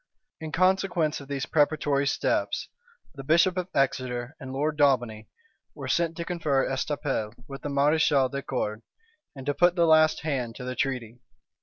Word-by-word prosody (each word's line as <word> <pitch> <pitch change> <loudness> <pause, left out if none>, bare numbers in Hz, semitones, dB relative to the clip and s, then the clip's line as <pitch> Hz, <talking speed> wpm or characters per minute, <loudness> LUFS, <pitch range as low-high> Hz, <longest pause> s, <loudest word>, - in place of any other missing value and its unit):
In 160 -1 -6
consequence 185 -3 +1
of 140 - -11
these 135 -2 -3
preparatory 145 -2 +1
steps, - - -1 0.4
the 135 - -9
bishop 170 +5 +3
of 180 -1 -2
Exeter 130 -1 -1
and 135 -3 -8
Lord 150 +3 -1
Daubeney 120 -7 +1 0.5
were - - -7
sent 165 -1 0
to 170 - -4
confer 155 -7 0
at - - -3
Estaples 135 -5 -2
with 135 0 -8
the 145 - -4
mareschal 140 -1 +3
de 140 +2 -5
Cordes, 110 -5 -3 0.5
and 135 -1 -9
to 145 - 0
put 175 +3 +3
the 170 -2 +3
last 155 -1 +4
hand 130 -7 -2
to 125 - -8
the 125 0 -4
treaty. 125 -3 -3
140 Hz, 170 wpm, -26 LUFS, 130-160 Hz, 0.5 s, last